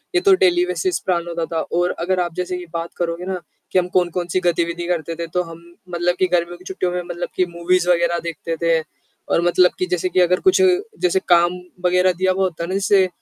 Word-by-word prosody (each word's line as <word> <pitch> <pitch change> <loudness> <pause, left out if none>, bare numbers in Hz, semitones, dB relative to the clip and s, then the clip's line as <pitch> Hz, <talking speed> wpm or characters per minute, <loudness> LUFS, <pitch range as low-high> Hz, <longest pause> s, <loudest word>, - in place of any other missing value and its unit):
ये 360 - +4
तो 395 - +5
daily 355 -1 +4
basis 370 0 -1
plan 175 -2 0
होता 170 -1 -2
था 165 - 0 0.2
और 175 0 +2
अगर 185 +2 0
आप 175 -2 -1
जैसे 180 0 -3
कि 180 - -7
बात 170 0 -3
करोगे 170 0 -2
ना, 185 -1 -3 0.3
कि 185 - +4
हम 180 - -1
कौन-कौन 175 -1 +1
सी 185 - +3
गतिविधि 170 0 0
करते 170 -2 -2
थे 170 0 -5
तो 180 - +2
हम 165 -1 -11 0.3
मतलब 175 0 0
कि 185 - +3
गर्मियों 175 0 0
की 180 - -17
छुट्टियों 185 -1 -2
में 180 0 -2
मतलब 175 0 -5
कि 185 - +2
मूवीज़ 175 +1 +1
वग़ैरह 170 -1 +2
देखते 165 0 -4
थे 165 -1 +3 0.5
और - - +2
मतलब 180 +1 +4
कि 185 - +1
जैसे 180 +1 0
कि 185 - +1
अगर 180 +1 +3
कुछ 375 - +3 0.4
जैसे 180 +1 +2
काम 175 0 +5 0.3
वग़ैरह 180 +1 +3
दिया 185 +2 +1
हुआ 190 +1 0
होता 170 -3 -2
ना 185 - -4
जैसे, 195 -1 +3
175 Hz, 230 wpm, -20 LUFS, 170-185 Hz, 0.5 s, तो